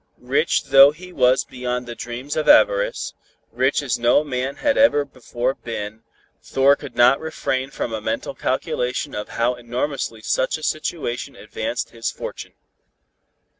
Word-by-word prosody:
Rich - - +1
though 135 +1 +9
he 180 +5 -10
was 130 -2 +3
beyond 125 -1 -4
the 120 - -6
dreams 120 +4 -6
of 155 - 0
avarice, - - +4 0.4
rich 135 +3 +1
as 130 -4 -1
no 120 +5 +4
man 130 -1 -3
had 285 -1 +1
ever 145 - +4
before 130 -1 -3
been, 110 -3 -6 0.4
Thor 135 +1 +3
could 145 -1 -10
not 125 +3 +5
refrain 135 -4 -2
from 120 - -4
a 110 - -3
mental - - -3
calculation 125 +4 -2
of 105 - -5
how 120 +2 +2
enormously 120 -1 -4
such 130 +6 0
a 155 - -12
situation 155 -5 -3
advanced - - -4
his - - -3
fortune. - - -7
130 Hz, 150 wpm, -22 LUFS, 120-145 Hz, 0.4 s, though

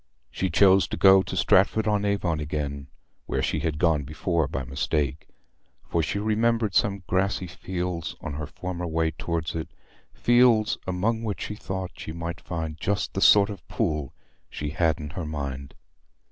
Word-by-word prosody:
She 95 - -1
chose 95 +3 +5
to - - -4
go 95 0 +7
to - - -5
Stratford 105 +3 +3
on 105 -1 +1
Avon 95 -6 0
again, 70 -2 -4 0.4
where - - -1
she - - 0
had 80 -2 -2
gone 80 -2 +2
before 80 +2 -1
by 65 -1 -3
mistake, 70 +2 -2 0.6
for 85 - +1
she 80 +5 -2
remembered 110 0 +1
some 100 -1 +1
grassy 95 0 0
fields 90 -1 -4
on 75 - -5
her 75 0 -5
former 90 +2 -5
way 80 0 0
towards 80 -1 -3
it—fields 115 +7 +1
among 105 +5 0
which 110 -3 -3
she 105 - -4
thought 95 -3 -5
she 80 - -6
might 85 0 -5
find 80 -2 -5
just 100 +2 -1
the 95 - -2
sort 105 0 +6
of 100 - -10
pool 75 -4 -1 0.4
she 75 -1 -4
had 80 0 +1
in 75 -1 -6
her 85 -1 -5
mind. 70 -3 -5
85 Hz, 165 wpm, -26 LUFS, 75-100 Hz, 0.6 s, go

